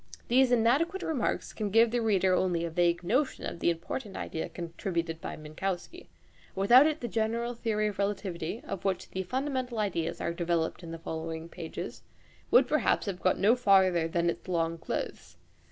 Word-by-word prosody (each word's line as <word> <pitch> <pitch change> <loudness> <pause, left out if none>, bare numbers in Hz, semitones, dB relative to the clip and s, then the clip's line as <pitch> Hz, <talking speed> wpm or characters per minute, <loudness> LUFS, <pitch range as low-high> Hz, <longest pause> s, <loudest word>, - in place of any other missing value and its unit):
These 255 +1 +4
inadequate 280 - +2
remarks 295 -7 -1
can 215 -2 -2
give 225 +2 +5
the 240 0 +1
reader 190 -4 +3
only 175 -2 +1
a 170 - -4
vague 175 +1 +2
notion 255 +10 0
of - - -5
the - - +2
important 190 +6 -4
idea 160 - -4
contributed 170 -1 -4
by - - -5
Minkowski. 180 - -5 0.5
Without 240 +9 +7
it 310 0 -2
the 240 - -2
general 230 +2 -1
theory 220 -2 -1
of 200 - -9
relativity, 200 -1 -2
of 180 - -5
which 190 -1 -2
the 190 - -2
fundamental 255 +3 -2
ideas 175 -6 -1
are 170 - -2
developed 170 -1 -1
in 170 - -9
the 165 - -5
following 160 0 -5
pages, 165 -1 -7 0.5
would - - +6
perhaps - - +2
have 190 -4 -4
got 185 +1 +2
no 215 +5 +4
farther 190 -8 +4
than 170 +1 0
its 170 - -2
long 165 -2 0
clothes. - - -5
190 Hz, 175 wpm, -29 LUFS, 170-235 Hz, 0.5 s, Without